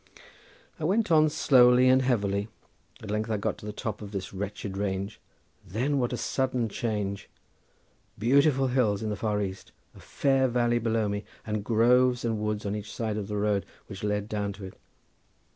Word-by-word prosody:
I -, -, -6 dB
went 200 Hz, +4 st, +1 dB
on 155 Hz, -1 st, +5 dB
slowly 125 Hz, -4 st, +5 dB
and 130 Hz, +1 st, +5 dB
heavily; 100 Hz, -5 st, 0 dB, 0.6 s
at 105 Hz, -, -5 dB
length 110 Hz, +1 st, -1 dB
I 110 Hz, -, 0 dB
got 100 Hz, -, -2 dB
to 105 Hz, -, -9 dB
the -, -, -3 dB
top 105 Hz, 0 st, -5 dB
of 105 Hz, -, -7 dB
this 95 Hz, -2 st, -5 dB
wretched 100 Hz, 0 st, -5 dB
range—then 100 Hz, +6 st, -4 dB
what 120 Hz, -2 st, 0 dB
a 125 Hz, -, -2 dB
sudden 130 Hz, -4 st, -1 dB
change! 100 Hz, -3 st, -3 dB, 0.9 s
Beautiful 135 Hz, +3 st, +3 dB
hills 110 Hz, -5 st, +1 dB
in 110 Hz, -, -2 dB
the -, -, -1 dB
far 105 Hz, 0 st, -1 dB
east, 95 Hz, 0 st, -7 dB, 0.2 s
a -, -, -15 dB
fair 135 Hz, -1 st, +1 dB
valley 120 Hz, -1 st, +1 dB
below 115 Hz, -2 st, 0 dB
me, 105 Hz, +1 st, -3 dB, 0.2 s
and 105 Hz, -1 st, -2 dB
groves 120 Hz, +2 st, +3 dB
and 110 Hz, -2 st, -1 dB
woods 105 Hz, 0 st, -2 dB
on 100 Hz, +1 st, -1 dB
each 105 Hz, 0 st, -6 dB
side 110 Hz, -2 st, -3 dB
of 105 Hz, -2 st, -4 dB
the 105 Hz, 0 st, -3 dB
road 105 Hz, -1 st, +1 dB, 0.2 s
which 100 Hz, -2 st, -9 dB
led 105 Hz, 0 st, -1 dB
down 105 Hz, -2 st, -2 dB
to 100 Hz, 0 st, -9 dB
it. 95 Hz, -, -9 dB
110 Hz, 180 wpm, -28 LUFS, 100-125 Hz, 0.9 s, on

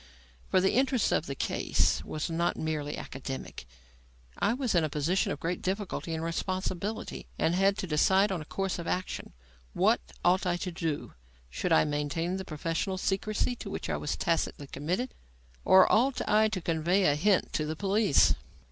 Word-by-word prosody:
For -, -, +4 dB
the 190 Hz, +1 st, +2 dB
interest 260 Hz, -2 st, +2 dB
of -, -, +1 dB
the 140 Hz, -, -4 dB
case 70 Hz, -, +1 dB
was 155 Hz, -, -3 dB
not 170 Hz, +1 st, 0 dB
merely 150 Hz, -2 st, -3 dB
academic. 130 Hz, -, -7 dB, 0.7 s
I 205 Hz, -, +2 dB
was 255 Hz, -3 st, -1 dB
in 170 Hz, -3 st, +3 dB
a 155 Hz, -, 0 dB
position 155 Hz, +6 st, 0 dB
of 145 Hz, -, -4 dB
great 170 Hz, +1 st, -2 dB
difficulty 190 Hz, -3 st, -3 dB
and 160 Hz, -, -4 dB
responsibility 185 Hz, +4 st, -3 dB
and 165 Hz, -, +2 dB
had 195 Hz, +2 st, +3 dB
to -, -, -2 dB
decide 190 Hz, +5 st, +3 dB
on 180 Hz, -4 st, -2 dB
a -, -, -8 dB
course 195 Hz, +3 st, -2 dB
of 170 Hz, -, -5 dB
action. 185 Hz, +1 st, -3 dB, 0.4 s
What -, -, +3 dB, 0.2 s
ought 185 Hz, +1 st, +3 dB
I 175 Hz, -1 st, +1 dB
to 180 Hz, +1 st, -4 dB
do? 165 Hz, -3 st, -3 dB, 0.4 s
Should -, -, -2 dB
I 80 Hz, -, +6 dB
maintain 150 Hz, +5 st, -1 dB
the 190 Hz, -, -5 dB
professional 165 Hz, +4 st, -2 dB
secrecy 205 Hz, +5 st, 0 dB
to 200 Hz, -, -7 dB
which -, -, -4 dB
I -, -, 0 dB
was 150 Hz, -, -3 dB
tacitly 165 Hz, -3 st, -1 dB
committed, 175 Hz, -, -3 dB, 0.5 s
or 190 Hz, 0 st, +7 dB
ought 255 Hz, +4 st, +3 dB
I 215 Hz, +1 st, +4 dB
to 205 Hz, -4 st, -3 dB
convey 170 Hz, +4 st, +1 dB
a 145 Hz, -, +5 dB
hint 185 Hz, +6 st, +2 dB
to 155 Hz, -1 st, -1 dB
the 155 Hz, -, -3 dB
police? 200 Hz, -2 st, +3 dB
175 Hz, 180 wpm, -29 LUFS, 155-195 Hz, 0.7 s, or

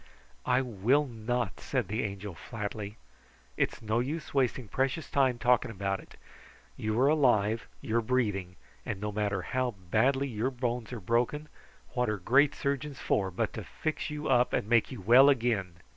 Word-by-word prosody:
"I 125 Hz, +1 st, +4 dB
will 125 Hz, +5 st, +2 dB
not," 120 Hz, -4 st, -3 dB
said -, -, -2 dB
the 110 Hz, +3 st, -1 dB
Angel 100 Hz, -1 st, -4 dB
flatly. 105 Hz, +2 st, -6 dB, 0.6 s
"It's -, -, -1 dB
no 110 Hz, +2 st, +1 dB
use 145 Hz, +6 st, -3 dB
wasting 130 Hz, -3 st, +1 dB
precious 135 Hz, -, -1 dB
time 130 Hz, -3 st, +3 dB
talking 125 Hz, +1 st, +3 dB
about 95 Hz, -2 st, -2 dB
it. -, -, -15 dB, 0.6 s
You 110 Hz, -, -1 dB
are 135 Hz, -, +5 dB
alive. 115 Hz, -8 st, +3 dB
You 110 Hz, -, -1 dB
are -, -, +3 dB
breathing; 105 Hz, -7 st, -1 dB, 0.3 s
and 95 Hz, -, -4 dB
no 105 Hz, +1 st, -3 dB
matter 100 Hz, -2 st, -1 dB
how 130 Hz, -3 st, -1 dB, 0.2 s
badly 135 Hz, +5 st, +3 dB
your 115 Hz, 0 st, -1 dB
bones 120 Hz, -3 st, -3 dB
are 120 Hz, -, -5 dB
broken, 120 Hz, +9 st, 0 dB, 0.4 s
what 125 Hz, -2 st, 0 dB
are 105 Hz, -, -1 dB
great 135 Hz, +9 st, +3 dB
surgeons 140 Hz, 0 st, -2 dB
for 95 Hz, -2 st, +1 dB
but 90 Hz, -, -2 dB
to -, -, -5 dB
fix 155 Hz, 0 st, -3 dB
you 150 Hz, 0 st, -4 dB
up 125 Hz, -1 st, +3 dB
and -, -, 0 dB
make 120 Hz, +2 st, +3 dB
you 125 Hz, -6 st, -7 dB
well 125 Hz, +8 st, +7 dB
again? 115 Hz, -9 st, +1 dB
120 Hz, 175 wpm, -30 LUFS, 105-130 Hz, 0.6 s, well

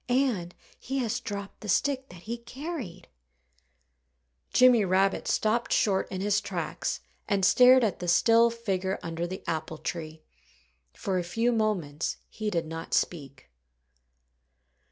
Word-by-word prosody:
And 245 Hz, -9 st, +1 dB, 0.2 s
he 270 Hz, +2 st, -4 dB
has 245 Hz, -2 st, -1 dB
dropped 200 Hz, -4 st, -7 dB
the 210 Hz, -, -7 dB
stick 270 Hz, +5 st, +1 dB
that 180 Hz, -1 st, -13 dB
he 230 Hz, +2 st, -4 dB
carried." 240 Hz, -, -7 dB, 1.4 s
Jimmy 250 Hz, -3 st, +6 dB
Rabbit 195 Hz, +1 st, +1 dB
stopped 225 Hz, +2 st, +1 dB
short 195 Hz, -3 st, +2 dB
in 190 Hz, -1 st, -3 dB
his 205 Hz, +1 st, +2 dB
tracks 175 Hz, -, -3 dB, 0.3 s
and 195 Hz, -2 st, +2 dB
stared 255 Hz, +4 st, +7 dB
at 210 Hz, -6 st, 0 dB
the 180 Hz, -, -5 dB
still 230 Hz, +6 st, +5 dB
figure 195 Hz, -5 st, -2 dB
under 165 Hz, +1 st, -3 dB
the 185 Hz, +2 st, -7 dB
apple 160 Hz, -1 st, -3 dB
tree. 155 Hz, -1 st, -6 dB, 0.7 s
For 190 Hz, -2 st, -2 dB
a -, -, -2 dB
few 230 Hz, +8 st, 0 dB
moments 185 Hz, -10 st, -1 dB
he 215 Hz, -1 st, -4 dB
did 170 Hz, -5 st, -1 dB
not 165 Hz, +1 st, -4 dB
speak. 140 Hz, -6 st, -3 dB
195 Hz, 135 wpm, -28 LUFS, 175-235 Hz, 1.4 s, stared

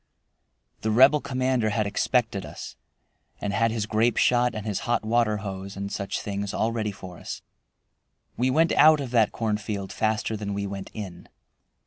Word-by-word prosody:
The 110 Hz, -, -1 dB
Rebel 135 Hz, +7 st, +6 dB
commander 130 Hz, -4 st, 0 dB
had 105 Hz, 0 st, 0 dB
expected 110 Hz, -1 st, 0 dB
us, -, -, -8 dB, 0.6 s
and 100 Hz, -, -2 dB
had 115 Hz, +3 st, +2 dB
his 110 Hz, -2 st, -2 dB
grape 110 Hz, +2 st, +1 dB
shot 120 Hz, -1 st, +3 dB
and 105 Hz, -1 st, -5 dB
his 105 Hz, -3 st, -1 dB
hot 120 Hz, -, +1 dB
water 110 Hz, -1 st, +2 dB
hose, 95 Hz, 0 st, -6 dB
and 100 Hz, 0 st, -4 dB
such 100 Hz, -, -3 dB
things 100 Hz, -1 st, -4 dB
all 115 Hz, -, +1 dB
ready 110 Hz, -2 st, -2 dB
for 90 Hz, -3 st, -10 dB
us. -, -, -7 dB, 0.9 s
We 125 Hz, +2 st, +1 dB
went 160 Hz, +5 st, +3 dB
out 155 Hz, 0 st, +6 dB
of 135 Hz, -4 st, -4 dB
that 115 Hz, -4 st, +3 dB
cornfield 105 Hz, -3 st, -3 dB
faster 110 Hz, 0 st, 0 dB
than 100 Hz, -1 st, -4 dB
we 100 Hz, 0 st, -2 dB
went 100 Hz, -1 st, -6 dB
in. 95 Hz, -5 st, -8 dB
110 Hz, 170 wpm, -26 LUFS, 100-120 Hz, 0.9 s, Rebel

